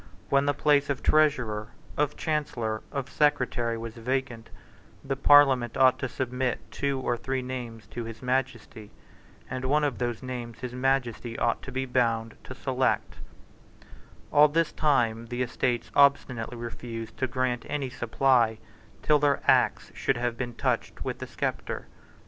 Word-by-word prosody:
When 140 +1 +3
the 145 - +2
place 145 -1 +3
of 140 -3 -2
Treasurer, 125 -9 +2 0.3
of 150 0 0
Chancellor, 120 -9 -2
of 140 -2 -3
Secretary, 125 -6 +1
was 115 0 -6
vacant, 125 -1 -3 0.6
the 135 0 -1
Parliament 135 -4 +5
ought 130 -1 +5
to 130 - -2
submit 125 0 -2
two 140 -1 -1
or 120 -2 0
three 130 +1 -3
names 120 -3 -6
to 120 -1 -5
his 115 +1 -9
Majesty; 125 -4 -2 0.6
and 130 0 -5
one 150 +3 +2
of 140 -5 -1
those 120 -1 -2
names 120 -2 -6
his 125 -1 -5
Majesty 125 -3 -1
ought 115 - 0
to 135 - -8
be 130 0 -2
bound 115 -3 0
to 130 - -8
select, 130 0 -1 1.1
All 150 +1 +7
this 160 +2 +1
time 115 -7 +1
the 125 +2 -2
Estates 120 0 -1
obstinately 130 -4 +3
refused 115 -1 -7
to 130 - 0
grant 125 -2 -1
any 140 -3 -2
supply 120 -2 +2 0.5
till 150 -1 +4
their 145 -1 +2
Acts - - +3
should - - 0
have 120 0 -1
been 120 -1 -5
touched - - -1
with - - -3
the - - -6
sceptre. - - -3
125 Hz, 155 wpm, -27 LUFS, 120-135 Hz, 1.1 s, All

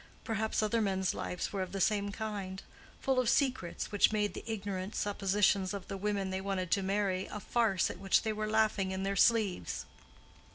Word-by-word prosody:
Perhaps 220 -1 0
other 225 +2 +1
men's 190 -2 +1
lives 180 - -4
were 195 - -1
of 185 0 -4
the 195 - -2
same 205 0 +1
kind—full 210 +5 -4
of 250 -3 +2
secrets 255 - 0
which 205 0 +4
made 210 -1 0
the - - -7
ignorant 200 -2 -4
suppositions 200 -1 +1
of 195 - -7
the - - -3
women 195 -1 -1
they 190 0 -2
wanted 190 -2 -2
to 200 - +3
marry 195 -1 0
a 210 - -6
farce 205 -3 +1
at 175 - -10
which 195 -1 +3
they 220 -1 0
were 215 0 -2
laughing 215 -3 +2
in 190 0 -3
their 195 0 -1
sleeves. 205 - +2
200 Hz, 190 wpm, -32 LUFS, 190-215 Hz, -, which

